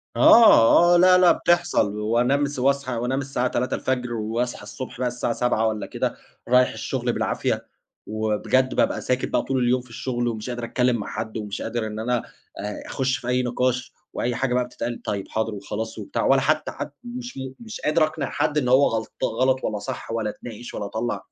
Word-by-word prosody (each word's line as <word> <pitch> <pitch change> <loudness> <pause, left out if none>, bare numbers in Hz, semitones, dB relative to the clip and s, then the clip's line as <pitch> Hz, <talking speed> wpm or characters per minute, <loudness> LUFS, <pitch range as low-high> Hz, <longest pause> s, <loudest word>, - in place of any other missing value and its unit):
آه، 175 - +7
آه، - - +6
لأ، 180 +1 +7
لأ 180 -1 +6
بتحصل. 175 -12 +1
وأنام 120 +6 +2
وأصحى 135 0 +1
وأنام 125 +4 -1
الساعة 130 -2 -1
03:00 125 0 -1
وأصحى 115 +2 -2
الصبح 125 +4 -8
بقى 130 - +1
الساعة 120 -1 -2
07:00 115 -2 +1
والَّا 110 -1 -2
كده - - -2 0.3
رايح 125 +1 +5
الشغل - - -2
بالعافية. - - -1 0.4
وبجد 110 +4 0
بابقى - - +1
ساكت 125 0 0
بقى - - +1
طول 130 -2 -1
اليوم 125 +1 +2
في 125 - -19
الشغل 120 0 -2
ومش 110 0 -4
قادر 120 -1 -4
أتكلم 125 +1 +1
مع 105 - -4
حد 110 0 -5
ومش 105 -2 -5
قادر 115 -2 -2
إن 110 0 -6
أنا 120 +2 0 0.4
أ 105 +1 -5
أخش 135 -1 0
في 120 - -9
أي 125 0 +1
نقاش 125 +1 -1 0.2
وأي 120 0 -1
حاجة 130 -1 0
بقى 125 0 +2
بتتقال 120 -1 -5
طيب 100 -2 -3
حاضر 110 0 -1
وخلاص 105 +3 -5
وبتاع، 105 - -3
ولا 135 0 +4
حتى 155 +3 +1
حت 145 - -6
مش 245 - -7 0.2
مش 225 -2 -8
قادر 155 +1 +2
أقنع 155 -3 -4
حد 150 0 0
إن 135 -4 +1
هو 130 +3 +5
غلط 110 0 -2
غلط 130 +3 +1
والَّا 105 - -2
صح 100 - -6
والَّا 115 -2 -1
أتناقش 120 +2 -9
والَّا 105 - -4
أطلّع 110 +4 -3
125 Hz, 190 wpm, -24 LUFS, 110-135 Hz, 0.4 s, آه